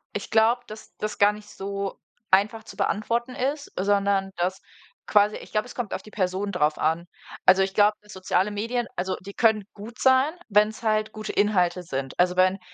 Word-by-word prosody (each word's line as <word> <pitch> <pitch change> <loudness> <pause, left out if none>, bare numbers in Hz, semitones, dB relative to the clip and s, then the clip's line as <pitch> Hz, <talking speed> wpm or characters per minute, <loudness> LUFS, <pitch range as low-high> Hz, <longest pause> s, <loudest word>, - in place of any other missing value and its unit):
Ich 205 - -4
glaube, 225 +2 +3
dass 215 +1 -11
das 215 0 -4
gar 205 0 +6
nicht 210 0 -12
so 200 0 -5 0.3
einfach 210 +4 +3
zu - - -12
beantworten 235 +4 -1
ist, 285 +3 -2
sondern, 200 0 +1
dass 180 +2 -1 0.5
quasi 210 0 +4
ich - - -12
glaube, 215 0 0
es - - -11
kommt 240 -4 -4
auf - - -3
die 215 - -14
Person 190 0 -1
darauf 150 -5 +1
an. 165 +2 0 0.4
Also 190 - +6
ich 190 0 -3
glaube, 210 +1 +4
dass 210 0 -14
soziale 190 +1 0
Medien 230 +4 -2
also 185 +1 -2
die 200 +2 -9
können 220 -3 +2
gut 215 +3 -11
sein, 260 +3 +4 0.2
wenn's 210 +2 +2
halt 215 -1 +1
gute 215 0 -5
Inhalte 185 -3 +2
sind. 135 -5 -5
Also 180 0 +3
wenn 185 +1 +3
205 Hz, 195 wpm, -25 LUFS, 190-220 Hz, 0.5 s, gar